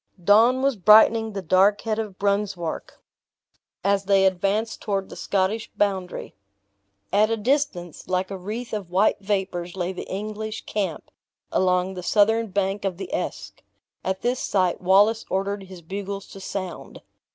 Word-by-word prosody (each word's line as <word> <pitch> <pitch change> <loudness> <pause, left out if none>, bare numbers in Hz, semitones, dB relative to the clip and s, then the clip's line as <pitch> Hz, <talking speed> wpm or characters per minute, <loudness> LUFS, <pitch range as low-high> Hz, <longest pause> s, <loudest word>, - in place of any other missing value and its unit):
Dawn 230 +7 +5
was 275 -4 +2
brightening 220 +3 +6
the 195 -1 -4
dark 190 +4 +4
head 220 -1 -2
of 210 -4 -5
Brunswark, 200 -4 -2 0.8
as 200 0 +1
they 195 -1 +4
advanced 195 +4 0
toward 195 -2 -2
the - - -9
Scottish 200 +3 -1
boundary. 190 -3 -1 0.8
At 210 +2 +4
a 225 - 0
distance, 220 - -1
like 185 +1 -1
a 195 - -4
wreath 220 +6 -6
of 200 -5 -4
white 190 +4 +2
vapors, 190 -3 -2
lay 185 0 -2
the 180 - -8
English 215 +2 -5
camp, 195 -6 -3 0.4
along 180 0 +1
the 180 - -6
southern 220 +5 +3
bank 195 0 -1
of 190 -3 -2
the 195 - -7
Esk. - - -4 0.4
At 190 0 -2
this 245 +1 0
sight, 185 -3 0
Wallace 205 +5 +4
ordered 195 +1 -2
his 185 -2 -12
bugles 195 +2 -5
to 195 - -10
sound. 185 -2 -6
200 Hz, 150 wpm, -24 LUFS, 185-215 Hz, 0.8 s, brightening